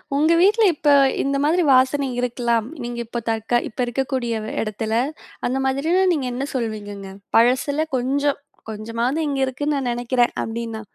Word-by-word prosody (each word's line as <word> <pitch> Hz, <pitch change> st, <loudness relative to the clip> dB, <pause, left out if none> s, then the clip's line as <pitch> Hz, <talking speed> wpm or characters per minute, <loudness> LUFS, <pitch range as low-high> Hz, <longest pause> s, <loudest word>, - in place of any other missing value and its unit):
உங்க 310 Hz, +3 st, +3 dB
வீட்ல 420 Hz, +5 st, +4 dB
இப்ப 295 Hz, 0 st, 0 dB, 0.3 s
இந்த 275 Hz, 0 st, 0 dB
மாதிரி 340 Hz, +4 st, +2 dB
வாசனை 265 Hz, +2 st, +3 dB
இருக்கலாம். 235 Hz, -2 st, 0 dB, 0.2 s
நீங்க 240 Hz, 0 st, -5 dB
இப்போ 235 Hz, +1 st, -4 dB
தற்க 225 Hz, +2 st, +1 dB
இப்ப 220 Hz, -, -20 dB
இருக்கக்கூடிய 240 Hz, -2 st, -2 dB, 0.2 s
எடத்துல? 220 Hz, +1 st, -3 dB, 0.5 s
அந்த 260 Hz, +2 st, -1 dB
மாதிரி 275 Hz, +5 st, 0 dB, 0.2 s
நீங்க 290 Hz, -5 st, -2 dB
என்ன 265 Hz, +3 st, -2 dB
சொல்வீங்கங்க? 205 Hz, -4 st, -4 dB, 0.3 s
பழசில 260 Hz, +6 st, +3 dB
கொஞ்சம் 280 Hz, +3 st, 0 dB, 0.3 s
கொஞ்சமாவது 230 Hz, +7 st, -2 dB
இங்க 280 Hz, -2 st, -2 dB
இருக்குனு 290 Hz, +3 st, -2 dB
நான் 260 Hz, -3 st, -1 dB
நினைக்கிறேன்? 240 Hz, 0 st, +1 dB
அப்படினா. 225 Hz, -1 st, -5 dB
250 Hz, 145 wpm, -22 LUFS, 230-280 Hz, 0.5 s, வீட்ல